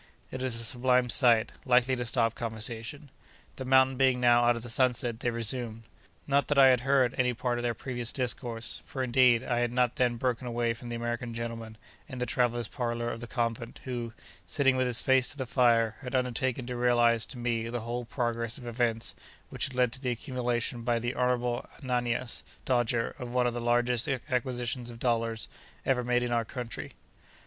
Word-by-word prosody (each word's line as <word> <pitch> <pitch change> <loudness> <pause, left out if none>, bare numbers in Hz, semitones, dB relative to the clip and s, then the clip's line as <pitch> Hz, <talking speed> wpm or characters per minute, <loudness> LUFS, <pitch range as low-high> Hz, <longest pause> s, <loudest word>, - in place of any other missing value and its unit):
It 130 - -5
is 125 -3 0
a - - -2
sublime 125 0 +2
sight, 120 -3 +4
likely 125 0 +3
to 120 -1 -3
stop 115 -1 +1
conversation. 115 +5 -5 0.5
The 130 - -5
mountain 130 0 +4
being 130 -1 +3
now 120 -1 +5
out 120 0 +4
of 115 - -6
the - - -7
sunset, 120 -2 +1
they 120 - 0
resumed. 115 -1 -2 0.4
Not 140 0 +2
that 145 - 0
I 135 -1 +8
had 125 -1 +4
heard 130 -1 +2
any 125 -1 +2
part 120 0 -1
of - - -2
their 120 -1 0
previous 120 -2 -4
discourse; 120 -3 -2
for 130 - -4
indeed, 125 -2 +4
I 120 -1 0
had 120 -1 0
not 125 -1 +1
then 125 -2 +2
broken 125 0 -1
away 120 -1 0
from 120 +1 -10
the 120 - -3
American 120 0 -3
gentleman, 115 -1 -5 0.3
in 130 - -7
the 125 - -1
travellers' 120 -1 0
parlour 120 0 -2
of 115 - -6
the 120 - -7
convent, 115 -1 -3
who, 120 -3 -4 0.3
sitting 135 +8 +3
with 130 0 +1
his 125 -1 +4
face 130 -1 +3
to 145 - -3
the 130 - -3
fire, 115 -3 +3
had 130 -1 -4
undertaken 125 0 0
to 125 0 -4
realise 120 -2 +3
to - - -7
me 115 -1 -1
the 120 0 -3
whole 120 +2 -3
progress 115 -1 -2
of 125 - -11
events 120 -1 0 0.4
which - - -2
had 130 - -6
led 125 -2 +3
to 130 +2 -7
the 130 - -1
accumulation 120 -1 -2
by 120 0 +1
the 120 +2 -2
Honourable 125 -1 0
Ananias 120 -1 -1 0.2
Dodger 120 -2 +1
of 125 - -5
one 125 0 +1
of 120 - +1
the 120 - -3
largest 120 0 +2
acquisitions 125 -2 -2
of 120 - -9
dollars 115 -2 0 0.4
ever 130 -2 +2
made 125 0 +1
in 120 - -2
our 120 -1 +2
country. 115 - -6
120 Hz, 200 wpm, -29 LUFS, 115-125 Hz, 0.5 s, I